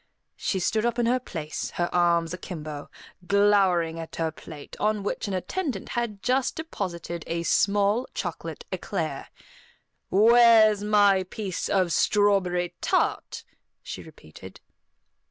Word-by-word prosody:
She 190 - -2
stood 215 +4 0
up 240 0 0
in 240 - +1
her 250 +2 +2
place, 160 -10 -5
her 175 - 0
arms 170 -1 +2
akimbo, 155 -5 -7 0.4
glowering 195 -5 +3
at 165 - -8
her 160 -1 -1
plate, 150 -2 -11
on 210 -1 0
which 205 - -3
an 195 - -2
attendant 260 - -3
had 225 -4 -3
just 255 +1 +1
deposited 170 - -5
a 170 0 -2
small 205 +7 +2
chocolate 480 - -5
eclair. - - -4 0.8
"Where's 220 0 +6
my 205 -2 +4
piece 185 0 -4
of 185 -4 +1
strawberry 190 -4 +2
tart?" - - -1 0.4
she - - -7
repeated. 95 +5 -13
195 Hz, 125 wpm, -26 LUFS, 170-215 Hz, 0.8 s, Where's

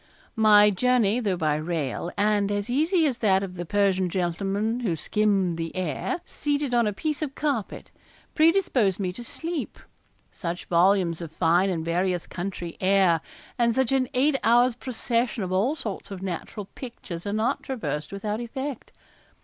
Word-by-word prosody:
My 210 -2 +6
journey, 235 +1 +2
though 200 -6 0
by 155 -3 +1
rail, 160 0 -3
and 205 -1 +2
as 205 +3 -2
easy 320 +6 +2
as 260 -5 -1
that 195 -3 +3
of 190 -2 -5
the 175 -1 -6
Persian 195 -2 +2
gentleman 195 +6 -1
who 205 -9 -1
skimmed 195 -2 +1
the 165 0 -4
air, 185 - -2
seated 290 -3 -2
on 235 -2 +3
a - - +1
piece 300 +9 -3
of 285 -3 -3
carpet, 280 -9 -3 0.4
predisposed 310 - +3
me 185 -2 -2
to 240 - -8
sleep. 325 +6 -5 0.5
Such 175 0 -5
volumes 175 -1 +3
of 165 -2 -6
fine 175 +4 +2
and 165 -3 -2
various 180 +1 0
country 175 -1 -5
air, 185 -4 +4 0.4
and 235 -1 +3
such 265 -2 +1
an 260 -2 +1
eight 270 +2 +3
hours' 240 +2 +5
procession 235 -2 -2
of 185 - -4
all 210 +11 +1
sorts 225 -10 -6
of 190 -2 -7
natural 190 +3 -5
pictures 205 -8 -8
are - - -1
not 215 +2 0
traversed 185 - -4
without 210 +2 -3
effect. 265 +2 -5
205 Hz, 165 wpm, -25 LUFS, 180-245 Hz, 0.5 s, My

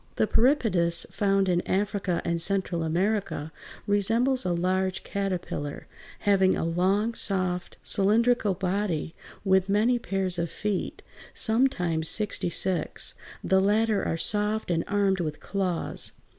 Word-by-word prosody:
The - - +2
Peripatus, 215 - +2
found 195 -1 +1
in 175 -1 +2
Africa 195 -2 -1
and 170 0 -1
Central 190 -2 0
America, 175 -1 -1 0.3
resembles 230 +6 +2
a 180 - 0
large 185 +2 -1
caterpillar, 180 -7 -4 0.4
having 190 -2 +3
a - - -1
long, 190 +7 +1
soft, 185 -4 -1
cylindrical 215 0 +2
body 185 -3 -2 0.3
with 190 0 +3
many 225 +5 +2
pairs 190 -5 -2
of 170 0 -1
feet, 205 -3 -4 0.3
sometimes 180 -10 +1
sixty 210 -4 0
six; 185 +1 0 0.3
the 190 0 +3
latter 210 +1 +2
are 165 - -1
soft 210 +2 0
and 165 -1 +1
armed 200 -2 +1
with 155 -3 -3
claws. 185 -4 0
195 Hz, 125 wpm, -26 LUFS, 175-210 Hz, 0.4 s, having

